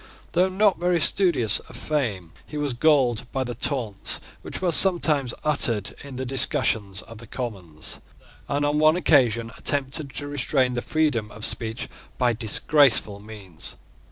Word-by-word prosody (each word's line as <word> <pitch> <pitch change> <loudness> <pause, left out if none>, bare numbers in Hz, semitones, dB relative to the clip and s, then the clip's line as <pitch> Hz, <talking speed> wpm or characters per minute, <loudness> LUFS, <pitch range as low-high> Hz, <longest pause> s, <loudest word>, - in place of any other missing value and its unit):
Though 180 +2 +2
not 195 +1 +2
very 175 0 +1
studious 160 - +3
of - - -12
fame, 105 - -3
he 150 - -7
was 145 -3 -2
galled 125 -3 +1
by 130 - -2
the 125 -1 -5
taunts 120 -7 0 0.2
which - - -7
were 180 -2 0
sometimes 155 -8 +3
uttered 120 -9 0
in 140 -2 -10
the 130 +1 -4
discussions 120 -7 +3
of 115 -1 -13
the 115 - -12
Commons, 95 - -5 0.5
and 145 +1 0
on 145 +1 0
one 155 +1 +4
occasion 120 -9 +2
attempted 140 0 -1
to 145 - -5
restrain 135 -2 0
the 120 - -2
freedom 145 -9 -1
of 110 +1 0
speech 115 +1 -1 0.3
by 125 -2 +2
disgraceful 115 -1 +2
means. 100 -6 -9
130 Hz, 155 wpm, -23 LUFS, 110-150 Hz, 0.5 s, one